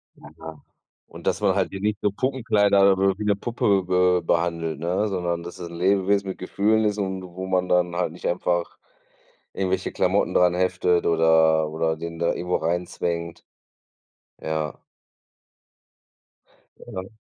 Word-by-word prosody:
Na 75 - -14
ja. 80 -2 -10 0.5
Und - - -13
dass 95 - 0
man 100 -3 +2
halt 95 -2 0
sie 95 - -7
nicht 105 0 -1
so 105 - +2
Puppenkleider 105 -5 +3
oder 95 0 +1
wie 105 - -4
'ne 105 -1 +3
Puppe 100 -3 +1
be 90 -1 +2
behandelt, 85 -2 -1
ne? 90 +6 -1
Sondern 85 -3 -2
dass 85 +1 -9
es 85 -1 -6
'n - - -9
Lebewesen 100 +1 +2
mit 95 - -5
Gefühlen 110 +4 +1
ist 105 0 0
und 95 -1 -3
wo 95 +1 -7
man 90 -1 0
dann 90 -1 +1
halt 90 -3 -1
nicht 90 - -8
einfach 85 0 -1 0.8
irgendwelche 95 -1 -1
Klamotten - - +1
dran 90 -1 +4
heftet 90 -1 +1
oder 80 -1 +3
oder 80 0 -1
den 85 0 -6
da 85 - +1
irgendwo 90 +1 -2
reinzwängt. 85 0 -3 1.0
Ja. 80 -1 -3 2.0
Ja. 95 +4 -8
90 Hz, 155 wpm, -24 LUFS, 85-100 Hz, 2.0 s, dran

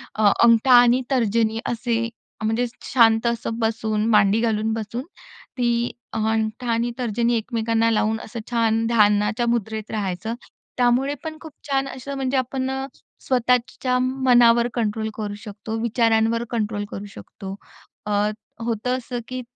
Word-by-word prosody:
अ, 215 - +1 0.2
अंगठा 235 +2 +5
आणि 245 +1 +4
तर्जनी 225 -3 +1
असे 235 -1 -1 0.4
अ, - - -2
म्हणजे 225 +3 +1 0.3
शांत 225 -2 +5
असं 230 -1 -2
बसून 220 -1 0
मांडी 210 -1 +4
घालून 220 -1 0
बसून 225 +3 -4 0.5
ती 240 -1 +1 0.2
अंगठा 220 +2 -1
आणि 230 +1 0
तर्जनी 235 0 0
एकमेकांना 230 0 0
लावून 220 0 +1
असं 230 +2 -7
छान 225 -1 +2
ध्यानाच्या 210 0 +3
मुद्रेत 220 -2 -2
राहायचं. 205 +1 -3 0.4
त्यामुळे 250 +3 +2
पण 315 -1 -6
खूप 320 - -10 0.2
छान 275 -1 0
असं 270 +1 -7
म्हणजे 270 0 -1
आपण 260 +1 -1 0.5
स्वतःच्या 250 0 +1
मनावर 245 -2 +4
कंट्रोल 220 -2 -1
करू 210 -2 -4
शकतो. 215 0 -6
विचारांवर 230 0 +2
कंट्रोल 210 -3 -2
करू 200 - -6
शकतो. 195 0 -9 0.5
अ, 210 - -3 0.5
होतं 235 +2 -1
असं, 245 -1 -5
की 255 0 -5
230 Hz, 135 wpm, -22 LUFS, 220-245 Hz, 0.5 s, अंगठा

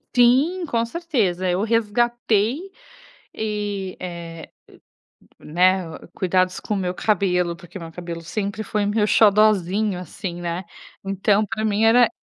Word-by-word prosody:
Sim, 270 +10 +4
com 235 -7 0
certeza! 230 - -1
Eu 180 +2 +1
resgatei 230 +1 +1 0.8
e, 205 -3 -3
eh 170 -2 -7 0.9
o - - -23
né, 180 +2 +2
o 160 - -11
cuidados 185 0 0
com 210 - -3
o - - -1
meu 180 -2 -2
cabelo, 180 -4 +1
porque 175 +2 -11
meu 165 -2 -8
cabelo 170 0 -7
sempre 200 +5 -4
foi 210 0 -1
meu 210 +1 +1
xodozinho, 210 -2 +3
assim, 175 +1 -6
né. 175 +1 -3 0.4
Então, 195 +2 +1
pra 215 +1 -3
mim 210 0 +1
era 235 +1 +6
200 Hz, 135 wpm, -22 LUFS, 180-220 Hz, 0.9 s, era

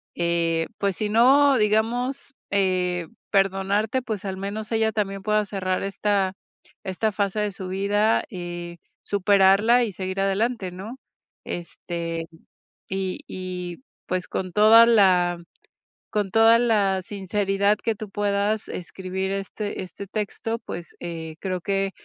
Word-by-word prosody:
eh, 170 -1 0
pues, 200 -3 -1
si 210 -1 -1
no, 265 +5 +5
digamos, 240 +6 0 0.2
eh, 180 -3 +1 0.2
perdonarte, 195 +5 +1
pues, 215 -4 -5
al 190 -1 -3
menos 210 +3 -5
ella 220 0 +2
también 195 -2 -2
pueda 210 -1 +2
cerrar 185 -2 -2
esta 195 -1 0 0.5
esta 200 +3 -1
fase 200 0 -1
de 210 -1 0
su 190 -1 -7
vida, 205 +3 +2
eh, 175 -2 -6 0.3
superarla 200 +4 +4
y 220 - -2
seguir 190 +1 -4
adelante, 195 0 0
¿no? 205 +8 -8 0.5
Este, 170 -1 -5 0.6
y 190 -1 -3
y, 180 -1 -5 0.3
pues, 180 0 -2
con 185 -1 -3
toda 220 +3 +8
la 185 -6 +4 0.7
con 205 -3 -1
toda 225 +1 +6
la 205 -5 +2
sinceridad 200 +1 0
que 225 0 -1
tú 210 0 -8
puedas 205 +1 0
escribir 190 +2 -4
este 195 +1 -4
este 185 +2 -9
texto, 220 +2 -3
pues, 175 -6 -8
eh, 165 -2 -6
creo 185 -2 -3
que 195 +1 0
195 Hz, 130 wpm, -24 LUFS, 185-215 Hz, 0.7 s, toda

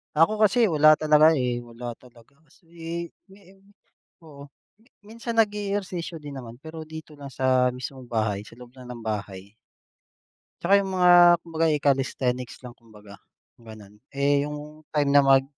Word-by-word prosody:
Ako 165 +8 +3
kasi, 220 +3 +3
wala 155 0 +6
talaga, 155 +1 +4
eh. 125 -3 -1
Wala 120 0 -8
talaga 125 +2 -21
kasi, 140 - -27
eh, 170 0 -6 0.2
me 195 +1 -18
eh, 195 - -23 0.6
oo. 145 -3 -13 0.6
Minsan 230 +2 -7
nag-e-ehersisyo 200 -5 -2
din 145 -1 -8
naman, 115 -2 -10
pero 160 +1 -9
dito 160 -1 -10
lang 140 - -8
sa 130 0 +2
mismong 130 0 -8
bahay, 110 -4 -1
sa - - -14
loob 125 -1 -13
lang 125 - -12
ng 120 -2 -9
bahay. 100 -3 -6 1.1
Tsaka 200 +3 +4
yung 195 -1 -3
mga 180 -1 +5 0.3
kumbaga, 165 -1 -2
eh, 150 -2 +1
calisthenics 130 -3 -1
lang 125 -1 -10
kumbaga, 105 -3 -16 0.4
gano'n. 105 -2 -14 0.2
Eh, 140 +1 +1
yung 150 +1 -9
time 145 -2 +1
na 145 0 +6
mag 135 -1 +5
140 Hz, 160 wpm, -24 LUFS, 120-165 Hz, 1.1 s, wala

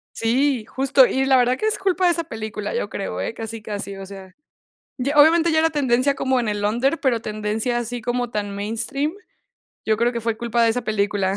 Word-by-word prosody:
Sí, 245 0 +1
justo, 265 0 +4
y 265 +1 0
la 270 -1 +4
verdad 250 +1 +2
que 435 - -3
es 435 - +1
culpa 375 -1 +1
de 350 - +5
esa 335 -1 -2
película, 215 - -5
yo 475 - -2
creo, - - -4
eh, - - -3
casi 225 0 -6
casi, 205 -2 -5
o 195 0 -8
sea, 190 -1 -11 0.6
y 265 +2 -2
obviamente 325 +3 +5
ya 315 - +2
era 325 +1 +3
tendencia 275 -2 +1
como 260 -1 0
en 235 -3 -1
el 205 0 -2
under, 245 +9 +1
pero 245 -5 +1
tendencia, 215 +3 -2
así 240 +1 -4
como 245 +1 -2
tan 205 -2 -3
mainstream, 230 +9 -2 0.7
yo 215 -1 +2
creo 240 +2 +1
que 235 - -3
fue 225 0 -2
culpa 235 0 0
de 225 - +4
esa 245 +2 -2
película. 200 -2 0
240 Hz, 215 wpm, -22 LUFS, 215-275 Hz, 0.7 s, de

